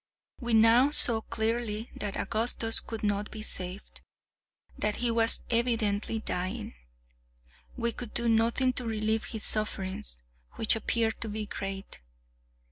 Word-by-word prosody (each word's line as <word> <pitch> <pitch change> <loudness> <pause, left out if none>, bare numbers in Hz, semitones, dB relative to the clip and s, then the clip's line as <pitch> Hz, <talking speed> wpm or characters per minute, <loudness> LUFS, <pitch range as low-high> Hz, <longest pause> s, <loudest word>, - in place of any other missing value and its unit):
We 240 -2 +1
now 230 +5 +6
saw 235 -6 +4
clearly 225 0 -2
that 205 -2 -4
Augustus 225 0 +2
could 225 -1 -7
not 205 0 0
be 215 - -7
saved; 185 -1 -7 0.7
that 210 0 -1
he 240 -1 +1
was 230 0 +3
evidently 225 -3 +1
dying. 215 +2 -4 1.0
We 235 -1 0
could 235 -1 -8
do 235 0 +3
nothing 230 +3 +3
to 250 - -1
relieve 220 0 0
his 220 -2 -4
sufferings, 190 - -2 0.3
which 220 - +3
appeared 225 0 0
to 225 - -3
be 215 0 -3
great. 195 - -6
220 Hz, 130 wpm, -29 LUFS, 210-235 Hz, 1.0 s, now